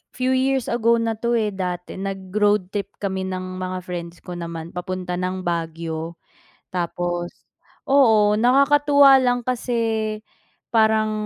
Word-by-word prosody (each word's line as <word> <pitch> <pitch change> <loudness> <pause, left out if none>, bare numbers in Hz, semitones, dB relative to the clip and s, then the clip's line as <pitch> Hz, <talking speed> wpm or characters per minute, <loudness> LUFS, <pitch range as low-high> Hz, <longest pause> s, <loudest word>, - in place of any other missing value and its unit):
few 255 +1 0
years 265 0 +1
ago 235 0 +3
na 230 -1 0
'to 235 +1 0
eh, 215 -2 0
dati 180 -1 -4
nag-road 195 0 0
trip 200 -1 -3
kami 190 -2 -2
ng 185 0 -5
mga 185 0 -3
friends 170 -1 -6
ko 180 - -7
naman 170 -1 -6
papunta 180 0 -4
ng 185 0 -3
Baguio. 165 -1 -3 0.6
Tapos, 175 0 -3 0.4
oo, 220 -7 +5
nakakatuwa 280 +2 +5
lang 245 -1 +2
kasi, 225 -3 -1 0.5
parang, 220 -1 +3
200 Hz, 130 wpm, -22 LUFS, 180-235 Hz, 0.6 s, oo